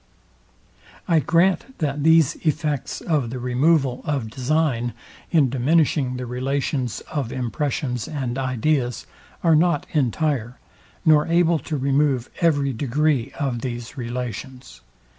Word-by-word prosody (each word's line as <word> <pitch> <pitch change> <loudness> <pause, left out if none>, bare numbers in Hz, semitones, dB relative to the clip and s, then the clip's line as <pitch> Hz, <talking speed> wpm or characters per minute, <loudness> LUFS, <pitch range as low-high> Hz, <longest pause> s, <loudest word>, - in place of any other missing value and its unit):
I 165 -2 +4
grant, 180 - +1
that 145 -2 -2
these 160 -2 +5
effects 150 -3 -2
of 150 -8 0
the 130 - -5
removal 130 +2 +1
of 135 -7 -2
design, 130 -2 0 0.4
in 145 -7 +3
diminishing 135 -1 +2
the 125 - -4
relations 130 0 -2
of 140 -6 -4
impressions 125 0 -2
and 130 -5 -3
ideas, 130 0 0 0.4
are 165 -2 +5
not 155 -2 +2
entire, 135 -3 0 0.5
nor 155 -2 +5
able 170 -1 +3
to 155 -1 -4
remove 135 -2 +1
every 145 -5 +2
degree 140 +1 0
of 130 -5 -1
these 120 -1 -5
relations. 125 - -6
135 Hz, 120 wpm, -23 LUFS, 125-155 Hz, 0.5 s, these